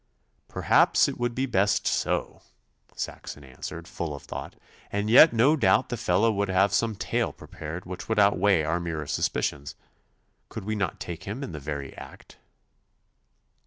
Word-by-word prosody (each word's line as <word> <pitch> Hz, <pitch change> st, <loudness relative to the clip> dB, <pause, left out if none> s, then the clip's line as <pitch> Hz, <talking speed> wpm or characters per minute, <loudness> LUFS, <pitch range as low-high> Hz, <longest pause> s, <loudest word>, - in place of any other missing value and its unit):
'Perhaps -, -, +3 dB
it -, -, -5 dB
would 120 Hz, -1 st, -1 dB
be 130 Hz, -, 0 dB
best 100 Hz, -5 st, +1 dB
so,' -, -, -1 dB, 0.5 s
Saxon 75 Hz, -, -6 dB
answered, 70 Hz, +5 st, -8 dB
full 80 Hz, -4 st, -4 dB
of 70 Hz, -, -11 dB
thought, -, -, -7 dB, 0.4 s
'and 100 Hz, +2 st, -1 dB
yet 155 Hz, +6 st, +9 dB
no 120 Hz, +7 st, +4 dB
doubt 135 Hz, -8 st, +3 dB
the -, -, -2 dB
fellow 115 Hz, +2 st, +2 dB
would 100 Hz, -1 st, -1 dB
have 95 Hz, +1 st, +3 dB
some 110 Hz, +1 st, +1 dB
tale -, -, -1 dB
prepared 80 Hz, +3 st, -8 dB
which 90 Hz, +3 st, -8 dB
would 110 Hz, -, 0 dB
outweigh 100 Hz, -3 st, +4 dB
our 85 Hz, +3 st, 0 dB
mere 80 Hz, -3 st, -4 dB
suspicions. 70 Hz, 0 st, -2 dB, 0.7 s
Could -, -, -7 dB
we 110 Hz, -, -2 dB
not 100 Hz, -5 st, -2 dB
take 85 Hz, -2 st, -7 dB
him 110 Hz, +8 st, -5 dB
in 95 Hz, -, -6 dB
the 75 Hz, -, -6 dB
very 70 Hz, -1 st, -6 dB
act? -, -, -13 dB
95 Hz, 160 wpm, -26 LUFS, 80-110 Hz, 0.7 s, yet